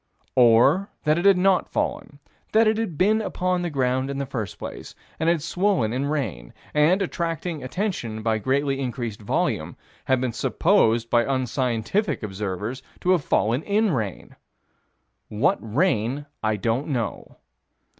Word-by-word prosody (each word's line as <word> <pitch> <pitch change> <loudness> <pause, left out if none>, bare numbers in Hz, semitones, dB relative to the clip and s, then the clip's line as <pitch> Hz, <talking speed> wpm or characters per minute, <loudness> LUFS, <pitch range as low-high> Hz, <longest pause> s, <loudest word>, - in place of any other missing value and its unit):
Or 125 - +5
that 155 +1 +2
it 175 - -3
had 195 -2 +6
not 190 0 +2
fallen; 145 - -3 0.4
that 220 +1 +5
it 215 0 +2
had 180 -9 -3
been 215 +4 +3
upon 185 -3 -1
the 175 - -2
ground 130 -2 0
in 140 - -3
the 140 - -2
first 120 -6 -5
place, - - -8 0.2
and 160 +1 +2
had 170 -3 +1
swollen 175 - +1
in 135 +3 -1
rain, 110 - -3 0.2
and, 165 +7 +3
attracting 170 -3 -3
attention 130 - -3
by 110 -1 +1
greatly 135 +3 0
increased 120 -5 -4
volume, 100 - -1 0.3
had 130 -1 +2
been 125 -2 -2
supposed 115 +1 +2
by 120 -1 +4
unscientific 130 - -1
observers 105 +4 -4 0.2
to 180 - +2
have 175 -6 +3
fallen 115 +5 +1
in 210 +3 +1
rain 110 - -4 0.9
What 110 +7 +1
rain, 130 - 0 0.2
I 110 0 +1
don't 115 +6 -1
know. 120 -7 -4
135 Hz, 150 wpm, -24 LUFS, 115-175 Hz, 0.9 s, had